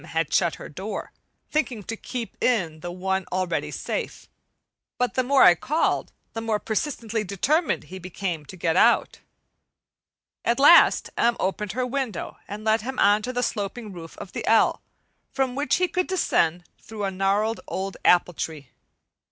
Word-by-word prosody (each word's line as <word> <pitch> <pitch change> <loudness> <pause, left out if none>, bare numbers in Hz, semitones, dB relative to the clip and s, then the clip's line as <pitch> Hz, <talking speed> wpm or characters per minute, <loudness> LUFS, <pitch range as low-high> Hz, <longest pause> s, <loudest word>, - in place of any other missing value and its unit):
had 160 -2 -2
shut 170 - +2
her - - -9
door, 195 +7 -6 0.4
thinking 260 -9 -1
to 225 - -5
keep 235 0 -6
in 175 -11 +1
the 175 +2 -6
one 190 +1 -1
already 185 -2 -1
safe. - - -5 0.7
But 250 0 0
the 255 - +2
more 270 +2 +5
I 175 - +9
called, 300 - 0 0.2
the 225 - -4
more 225 -2 0
persistently 225 -1 -2
determined 275 - 0
he 190 +1 -9
became 180 -2 -4
to 185 - -9
get 165 -1 0
out. - - +3 1.2
At 235 +3 +1
last 295 +5 +6
M. 235 0 +3
opened 195 +1 -2
her 255 +2 -1
window 250 -8 -3
and 210 +1 -7
let 220 0 +2
him 260 +4 -5
on 205 +1 +4
to 250 - -3
the 245 0 -1
sloping 210 0 -3
roof 165 -2 -10
of 185 - -9
the - - -5
"L," 225 0 +4 0.5
from 265 -2 -1
which 285 +3 +1
he 365 - +2
could 365 0 -1
descend 175 - +1 0.2
through 220 -2 -7
a 195 - -1
gnarled 200 +4 0
old 195 +1 -4
apple 180 0 +4
tree. 150 -4 -6
210 Hz, 170 wpm, -25 LUFS, 180-250 Hz, 1.2 s, I